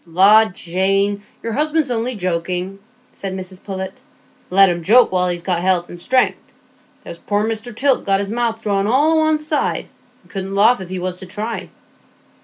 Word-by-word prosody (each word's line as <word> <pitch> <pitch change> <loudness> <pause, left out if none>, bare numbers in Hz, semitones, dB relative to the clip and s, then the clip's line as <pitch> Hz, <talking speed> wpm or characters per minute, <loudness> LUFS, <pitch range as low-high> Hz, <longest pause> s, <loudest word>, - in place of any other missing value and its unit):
"La, 200 +6 +6
Jane, 195 +2 -1 0.2
your 230 - -3
husband's 305 0 +1
only 240 +1 -1
joking," 180 +1 -2 0.3
said 195 -1 -6
Mrs 185 0 -9
Pullet; 190 -1 -6 0.5
"let 195 +1 +6
him 175 -1 -1
joke 230 +8 +5
while 180 -1 +1
he's 175 -1 -3
got 180 -2 0
health 180 -1 +1
and 175 - -10
strength. 255 +4 +1 0.6
There's 170 - -9
poor 205 +1 -1
Mr 225 +1 -4
Tilt 270 +2 +2
got 195 -1 +1
his 200 0 -3
mouth 230 -1 -2
drawn 200 -1 0
all 280 +7 +3
o' - - +3
one 315 0 +3
side, 305 0 -2 0.4
and - - -21
couldn't 195 0 -4
laugh 220 +3 +4
if 180 - -8
he 185 - -4
was 180 0 -3
to 185 - -9
try." 215 +4 -5
195 Hz, 185 wpm, -19 LUFS, 185-230 Hz, 0.6 s, La